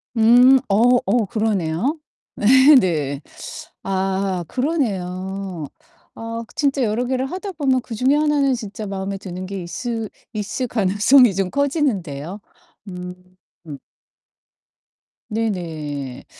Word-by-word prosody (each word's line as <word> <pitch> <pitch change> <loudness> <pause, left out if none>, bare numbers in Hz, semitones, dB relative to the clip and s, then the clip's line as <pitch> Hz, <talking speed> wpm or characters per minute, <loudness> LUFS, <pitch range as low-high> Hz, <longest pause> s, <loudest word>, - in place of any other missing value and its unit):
음 245 +4 +6
어 240 +5 +4
어 240 -3 +2
그러네요. 215 - -1 0.5
네. 265 +3 +8
네. 150 - 0 0.6
아 190 -1 -1
그러네요. 190 - -2 0.5
아 230 0 -5
진짜 280 -2 +1
여러 230 +3 0
개를 260 0 -1
하다 380 +1 -5
보면 270 -5 +1
그중에 250 +4 0
하나는 295 -2 +2
진짜 215 -2 -6
마음에 195 0 -4
드는 185 -1 -7
게 195 -1 -5
있을 225 +5 -4 0.2
있을 220 +5 -3
가능성이 220 +2 +4
좀 195 -1 0
커지는데요. 205 - -1 0.5
음. 180 -1 -7 2.2
네네. 160 - -4
215 Hz, 205 characters per minute, -21 LUFS, 185-255 Hz, 2.2 s, 네